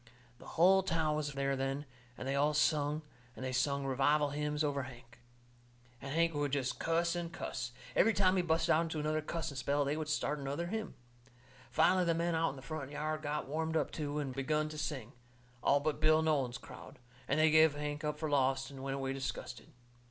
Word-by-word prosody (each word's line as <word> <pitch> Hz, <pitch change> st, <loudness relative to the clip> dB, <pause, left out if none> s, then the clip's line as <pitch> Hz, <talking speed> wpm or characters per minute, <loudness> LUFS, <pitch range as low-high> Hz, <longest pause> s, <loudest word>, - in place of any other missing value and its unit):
The -, -, -13 dB
hull 190 Hz, +3 st, +6 dB
town 160 Hz, -4 st, 0 dB
was 150 Hz, -1 st, -2 dB
there 140 Hz, 0 st, 0 dB
then, 135 Hz, +2 st, -2 dB, 0.3 s
and 130 Hz, -, -5 dB
they 135 Hz, -, 0 dB
all 150 Hz, +2 st, +2 dB
sung, 150 Hz, 0 st, +2 dB, 0.3 s
and 130 Hz, -, -6 dB
they 130 Hz, -, -2 dB
sung 140 Hz, +2 st, 0 dB
revival 145 Hz, +3 st, +2 dB
hymns 150 Hz, +1 st, -1 dB
over 145 Hz, -2 st, 0 dB
Hank. 120 Hz, -2 st, -11 dB, 0.8 s
And 135 Hz, -, -6 dB
Hank 165 Hz, +2 st, +2 dB
he 145 Hz, -, -3 dB
would 145 Hz, -1 st, -1 dB
jest 135 Hz, -3 st, -1 dB
cuss 170 Hz, +1 st, +1 dB
and 170 Hz, -1 st, -3 dB
cuss. 125 Hz, -6 st, -4 dB, 0.2 s
Every 225 Hz, -, +5 dB
time 190 Hz, -1 st, +4 dB
he 185 Hz, -, +3 dB
busted 160 Hz, -1 st, +1 dB
out 155 Hz, -, +4 dB
into 160 Hz, -2 st, -3 dB
another 155 Hz, +1 st, 0 dB
cussing 155 Hz, -2 st, -4 dB
spell 140 Hz, +3 st, +1 dB
they 140 Hz, +2 st, 0 dB
would 155 Hz, -1 st, -4 dB
start 150 Hz, -1 st, 0 dB
another 140 Hz, +5 st, -3 dB
hymn. 215 Hz, +4 st, -4 dB, 0.7 s
Finally 180 Hz, +3 st, +4 dB
the 165 Hz, -1 st, +2 dB
men 170 Hz, +1 st, 0 dB
out 165 Hz, 0 st, +2 dB
in 140 Hz, -, -7 dB
the 130 Hz, -, -11 dB
front 155 Hz, -3 st, -5 dB
yard 155 Hz, +1 st, -3 dB
got 145 Hz, -2 st, -3 dB
warmed 160 Hz, +2 st, -1 dB
up -, -, 0 dB
too, 150 Hz, -1 st, -3 dB
and 140 Hz, -3 st, -2 dB
begun 150 Hz, +3 st, 0 dB
to 155 Hz, -, -7 dB
sing, 135 Hz, -6 st, -4 dB, 0.5 s
all 140 Hz, -, +4 dB
but 150 Hz, +1 st, -1 dB
Bill 155 Hz, +1 st, +5 dB
Nolan's 140 Hz, -6 st, +1 dB
crowd, -, -, -12 dB, 0.3 s
and 140 Hz, -, +1 dB
they 155 Hz, 0 st, +5 dB
give 155 Hz, -1 st, +6 dB
Hank 150 Hz, +1 st, -4 dB
up 150 Hz, 0 st, -2 dB
for 155 Hz, -, -2 dB
lost 135 Hz, -1 st, +1 dB
and 135 Hz, -1 st, -9 dB
went 135 Hz, 0 st, -2 dB
away 135 Hz, -1 st, -2 dB
disgusted. 135 Hz, -2 st, -5 dB
150 Hz, 210 wpm, -34 LUFS, 135-160 Hz, 0.8 s, hull